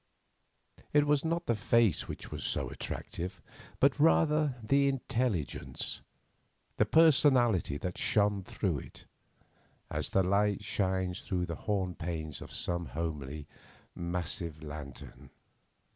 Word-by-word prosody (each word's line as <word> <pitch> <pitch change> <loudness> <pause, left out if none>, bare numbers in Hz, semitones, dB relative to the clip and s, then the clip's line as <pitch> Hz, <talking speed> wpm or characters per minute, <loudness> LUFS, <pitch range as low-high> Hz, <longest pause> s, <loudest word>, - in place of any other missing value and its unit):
It 145 0 +5
was 145 -1 +2
not 170 +1 -1
the 115 - +2
face 115 -3 +2
which - - -7
was - - -5
so - - 0
attractive, 90 +1 -5 0.4
but 140 +1 +4
rather 150 -2 +4
the 140 +5 +3
intelligence, 120 - -2 0.8
the - - +3
personality 130 - +4
that 90 +3 -4
shone 105 -1 +2
through - - -1
it, - - -12 0.9
as - - -2
the 95 - +3
light 100 +2 +2
shines 95 -4 -1
through 90 -3 -1
the 85 - -4 0.2
horn 95 -3 +1
panes 80 -4 -5
of - - -9
some 85 -1 -2
homely, 75 -2 -4 0.5
massive 85 -2 -3
lantern. 75 -3 -9
95 Hz, 120 wpm, -31 LUFS, 85-130 Hz, 0.9 s, It